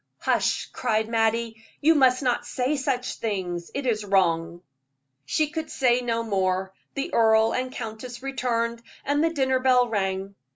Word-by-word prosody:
"Hush!" - - +1
cried 220 -3 0
Mattie, 225 0 0 0.2
"you 320 +3 +5
must 260 -3 +4
not 245 -2 +1
say 260 +4 -1
such 265 -2 -2
things 180 -6 -3
it 275 0 -3
is 220 -4 0
wrong." 175 -3 +1 0.6
She 305 - +1
could 320 0 -4
say 250 -2 +2
no 230 -1 -1
more; 190 -3 -1 0.2
the 285 +6 -3
earl 220 0 +4
and 255 0 -2
countess 240 +1 -7
returned, 235 -3 -1 0.2
and 290 +2 +1
the 330 - +3
dinner 265 -5 +1
bell 255 -1 +4
rang. 195 -2 -2
235 Hz, 155 wpm, -25 LUFS, 215-260 Hz, 0.6 s, you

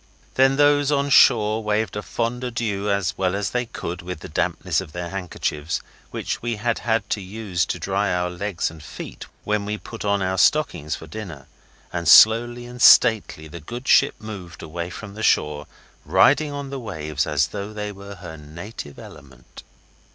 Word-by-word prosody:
Then 135 +1 +4
those 145 0 +4
on 140 0 +1
shore 110 -4 +5
waved 105 -1 -1
a 105 - -2
fond 120 +3 -3
adieu 110 -5 -2
as 100 -3 0
well 95 0 +1
as 100 -1 -2
they 125 -1 -1
could 90 -4 -6
with 90 -2 -7
the - - -8
dampness - - -1
of 75 - -11
their 90 0 -5
handkerchiefs, 85 -4 -3 0.3
which - - -4
we 120 -1 -2
had 115 +2 -1
had 115 -1 0
to 105 - 0
use 95 -2 -2
to - - -2
dry 100 +1 -1
our 90 0 -1
legs 90 -1 -2
and 80 -1 -13
feet 75 - -9 0.2
when 105 -1 0
we 105 +1 -3
put 115 +1 -9
on 100 -1 +1
our 95 0 -1
stockings 90 - +2
for - - -10
dinner, 80 -4 -8 0.5
and 85 -2 -3
slowly 120 +5 +6
and 125 0 -9
stately 110 -12 +5
the 85 +3 -9
good 120 - -8
ship - - +5
moved 95 -7 -9
away 85 +2 -5
from 105 +3 -8
shore, 75 -7 +1 0.4
riding 145 +2 +4
on 140 -1 -6
the 135 - -4
waves 75 - -3
as - - +1
though 100 0 -6
they 105 -1 -5
were 100 0 -10
her 90 -3 -9
native 75 - -9
element. 65 -4 -13
100 Hz, 180 wpm, -23 LUFS, 85-115 Hz, 0.5 s, slowly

